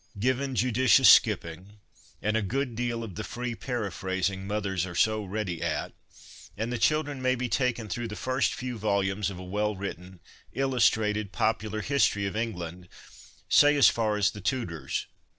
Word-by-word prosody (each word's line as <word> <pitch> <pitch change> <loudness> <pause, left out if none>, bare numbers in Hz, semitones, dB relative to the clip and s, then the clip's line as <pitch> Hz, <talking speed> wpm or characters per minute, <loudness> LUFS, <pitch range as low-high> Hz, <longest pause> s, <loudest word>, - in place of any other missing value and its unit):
Given, 130 +4 0
judicious 125 0 +5
skipping, 90 +5 +2 0.5
and 105 +1 +1
a 110 - +2
good 125 +5 -2
deal 120 0 -2
of 105 -4 -7
the 110 - -5
free 125 +1 -4
paraphrasing 95 -5 -3
mothers 100 -3 -1
are 90 -2 -6
so 110 +3 +2
ready 95 -3 -4
at, - - -2 0.6
and 115 +3 -2
the 120 - -2
children 145 -1 +1
may 130 0 +2
be 125 0 -2
taken 120 -2 0
through 120 +4 -3
the 105 - -7
first 130 +2 0
few 125 -2 -5
volumes 100 -1 0
of 95 - -8
a 90 - -8
well 105 +3 -1
written, 95 -2 -7 0.3
illustrated, 110 -6 +1
popular 110 -1 -1
history 130 -7 +2
of 100 - -3
Eng 115 -1 -2
land, 90 +1 -8 0.6
say 145 0 +6
as 140 - +7
far 110 -2 0
as 100 -3 +2
the 105 - -10
Tudors. 110 - -2
110 Hz, 170 wpm, -27 LUFS, 95-125 Hz, 0.6 s, as